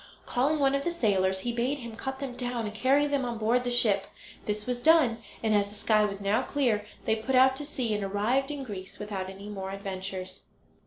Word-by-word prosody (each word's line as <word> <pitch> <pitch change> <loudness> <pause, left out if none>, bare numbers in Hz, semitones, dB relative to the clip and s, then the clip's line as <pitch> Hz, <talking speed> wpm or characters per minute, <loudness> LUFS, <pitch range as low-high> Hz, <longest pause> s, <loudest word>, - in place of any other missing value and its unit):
Calling 275 +5 +1
one 275 -2 +3
of 275 0 0
the 345 - 0
sailors, 190 - +1
he 240 - -1
bade 245 +4 0
him 235 -4 -8
cut 265 +3 -4
them 265 -2 -5
down, 245 -2 -2
and 210 - -4
carry 270 +6 +3
them 285 -2 0
on 240 -2 -3
board 230 +3 +2
the 245 - -1
ship. 210 -5 +2 0.4
This 210 0 -2
was 245 -1 -2
done, 300 -8 +5 0.2
and 220 -1 +2
as 200 -1 +2
the 205 - -12
sky 215 0 +3
was 200 -1 -3
now 200 +2 +2
clear 230 -8 0 0.2
they 220 - +3
put 225 +4 -1
out 260 +1 +6
to 290 - -4
sea, 255 -6 -2
and 205 -1 -1
arrived 215 +8 +1
in 290 -2 -4
Greece 195 -6 -7
without 200 -3 -4
any 195 +2 -9
more 195 -2 -5
adventures. 190 -1 -5
225 Hz, 225 wpm, -28 LUFS, 205-265 Hz, 0.4 s, out